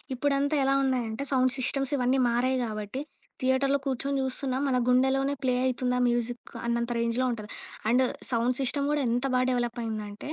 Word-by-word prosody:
ఇప్పుడంతా 285 Hz, +2 st, +1 dB
ఎలా 270 Hz, 0 st, +3 dB
ఉన్నాయంటే, 250 Hz, -2 st, -1 dB
సౌండ్ 255 Hz, -1 st, +3 dB
సిస్టమ్స్ 270 Hz, +1 st, -1 dB
ఇవన్నీ 255 Hz, +1 st, +2 dB
మారాయి 250 Hz, +2 st, +1 dB
కాబట్టి, 215 Hz, +3 st, -4 dB, 0.4 s
థియేటర్‌లో 265 Hz, +2 st, +2 dB
కూర్చొని 275 Hz, +1 st, -1 dB
జూస్తున్నా 260 Hz, 0 st, -2 dB
మన 260 Hz, -2 st, +2 dB
గుండెలోనే 265 Hz, +2 st, +3 dB
ప్లే 255 Hz, -1 st, +2 dB
అయితుందా 250 Hz, -1 st, 0 dB
మ్యూజిక్ 240 Hz, 0 st, -2 dB
అన్నంత 235 Hz, 0 st, 0 dB
రేంజ్‌లో 235 Hz, +2 st, +1 dB
ఉంటది. 215 Hz, -3 st, -6 dB, 0.4 s
అండ్ 250 Hz, +3 st, +4 dB, 0.3 s
సౌండ్ 240 Hz, +1 st, +1 dB
సిస్టమ్ 280 Hz, +2 st, 0 dB
గూడా 295 Hz, -1 st, +1 dB
ఎంత 245 Hz, +3 st, 0 dB
బాగా 255 Hz, 0 st, +3 dB
డెవలప్ 240 Hz, -1 st, -1 dB
అయిందంటే, 215 Hz, +1 st, -5 dB
255 Hz, 155 wpm, -28 LUFS, 235-270 Hz, 0.4 s, అండ్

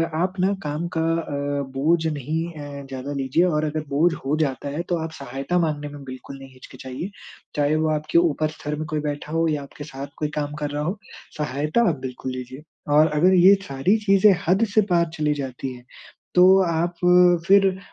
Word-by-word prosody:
आप 180 Hz, +3 st, 0 dB
ना 190 Hz, +2 st, +2 dB
काम 150 Hz, +3 st, -3 dB
का -, -, +2 dB
अ, 165 Hz, -1 st, -1 dB, 0.4 s
बोझ 160 Hz, +5 st, +1 dB
नहीं 155 Hz, +2 st, -2 dB
अ, 145 Hz, -2 st, -8 dB
ज़्यादा 135 Hz, +1 st, -6 dB
लीजिए 135 Hz, +4 st, +1 dB
और 155 Hz, -3 st, +1 dB
अगर 155 Hz, 0 st, -2 dB
बोझ 160 Hz, +5 st, +2 dB
हो 145 Hz, +3 st, +1 dB
जाता 140 Hz, -2 st, -1 dB
है, 145 Hz, +4 st, -3 dB
तो 175 Hz, -1 st, -1 dB
आप 160 Hz, -, -5 dB
सहायता 140 Hz, +6 st, -2 dB
मांगने 150 Hz, -3 st, -1 dB
में 145 Hz, -1 st, -10 dB
बिल्कुल 130 Hz, +1 st, -9 dB
नहीं 135 Hz, -1 st, -12 dB
हिचकिचाइए, 130 Hz, +6 st, -8 dB, 0.5 s
चाहे 145 Hz, +1 st, +2 dB
वो 155 Hz, 0 st, +1 dB
आपके 155 Hz, +2 st, 0 dB
ऊपर 155 Hz, -2 st, +2 dB
स्तर 150 Hz, +1 st, -4 dB
में 155 Hz, -, -3 dB
कोई 155 Hz, 0 st, -2 dB
बैठा 145 Hz, +1 st, -6 dB
हो 165 Hz, 0 st, +2 dB
या 150 Hz, -2 st, -1 dB
आपके 145 Hz, +1 st, -10 dB
साथ 140 Hz, -1 st, -7 dB
कोई 150 Hz, -, -2 dB
काम 145 Hz, 0 st, -3 dB
कर 145 Hz, -, -1 dB
रहा 145 Hz, 0 st, -2 dB
हो, 190 Hz, +6 st, -3 dB, 0.4 s
सहायता 150 Hz, -, 0 dB
आप 150 Hz, -6 st, -2 dB
बिल्कुल 130 Hz, 0 st, -5 dB
लीजिए। 130 Hz, +3 st, -8 dB, 0.3 s
और 155 Hz, +1 st, +6 dB
अगर 180 Hz, +5 st, +4 dB
ये 185 Hz, +2 st, +7 dB
सारी 140 Hz, +11 st, +1 dB
चीज़ें 195 Hz, +1 st, +6 dB
हद 190 Hz, +5 st, +3 dB
से 215 Hz, -, +7 dB
पार 170 Hz, -1 st, +3 dB
चली 150 Hz, -1 st, +1 dB
जाती 135 Hz, -2 st, -5 dB
हैं, 125 Hz, 0 st, -13 dB, 0.5 s
तो 185 Hz, +2 st, +7 dB
आप 170 Hz, +2 st, 0 dB, 0.5 s
फिर 195 Hz, -1 st, +5 dB
150 Hz, 200 wpm, -23 LUFS, 140-170 Hz, 0.5 s, ये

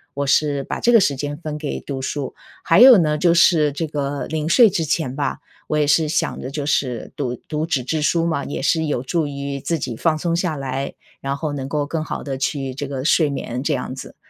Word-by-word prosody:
我 140 Hz, -, -1 dB
是 140 Hz, 0 st, +2 dB
把 -, -, -4 dB
这 240 Hz, -, +3 dB
个 230 Hz, -, +7 dB
时 145 Hz, -8 st, +2 dB
间 145 Hz, +2 st, -4 dB
分 155 Hz, -2 st, -5 dB
给 150 Hz, -, -4 dB
读 135 Hz, -2 st, -5 dB
书。 140 Hz, +1 st, -3 dB, 0.3 s
还 165 Hz, +4 st, +4 dB
有 255 Hz, -2 st, +10 dB
呢， 150 Hz, -4 st, +2 dB
就 170 Hz, 0 st, +4 dB
是 160 Hz, -3 st, +5 dB
这 155 Hz, +4 st, -3 dB
个 145 Hz, -1 st, -3 dB
临 155 Hz, 0 st, -3 dB
睡 230 Hz, +6 st, +7 dB
之 175 Hz, -4 st, 0 dB
前 150 Hz, -4 st, -1 dB
吧， 145 Hz, -, -2 dB, 0.3 s
我 155 Hz, -, 0 dB
也 150 Hz, -, +3 dB
是 150 Hz, +1 st, +3 dB
想 -, -, -1 dB
着 130 Hz, -, -5 dB
就 140 Hz, +1 st, -4 dB
是 130 Hz, -4 st, -1 dB
读 125 Hz, -3 st, -2 dB
读 155 Hz, +1 st, -2 dB
纸 135 Hz, -6 st, 0 dB
质 155 Hz, +5 st, -2 dB
书 165 Hz, +2 st, +2 dB
嘛， 160 Hz, -4 st, -1 dB
也 145 Hz, -, -5 dB
是 160 Hz, +3 st, +1 dB
有 140 Hz, -4 st, -1 dB
助 160 Hz, +3 st, -1 dB
于 140 Hz, -1 st, -4 dB
自 165 Hz, +4 st, -1 dB
己 130 Hz, -5 st, -4 dB
放 155 Hz, +4 st, +1 dB
松 170 Hz, +1 st, -1 dB
下 170 Hz, -2 st, -1 dB
来， 135 Hz, 0 st, -4 dB, 0.3 s
然 140 Hz, +1 st, -2 dB
后 150 Hz, -1 st, -3 dB
能 135 Hz, -1 st, -5 dB
够 145 Hz, -1 st, -1 dB
更 155 Hz, +2 st, -3 dB
好 -, -, -5 dB
地 135 Hz, -2 st, -4 dB
去 135 Hz, -1 st, -2 dB
这 140 Hz, +1 st, -5 dB
个 135 Hz, -1 st, -5 dB
睡 155 Hz, -2 st, +3 dB
眠 125 Hz, -2 st, -4 dB
这 145 Hz, +1 st, 0 dB
样 130 Hz, 0 st, -4 dB
子。 130 Hz, -, -9 dB
145 Hz, 260 characters per minute, -21 LUFS, 140-160 Hz, 0.3 s, 有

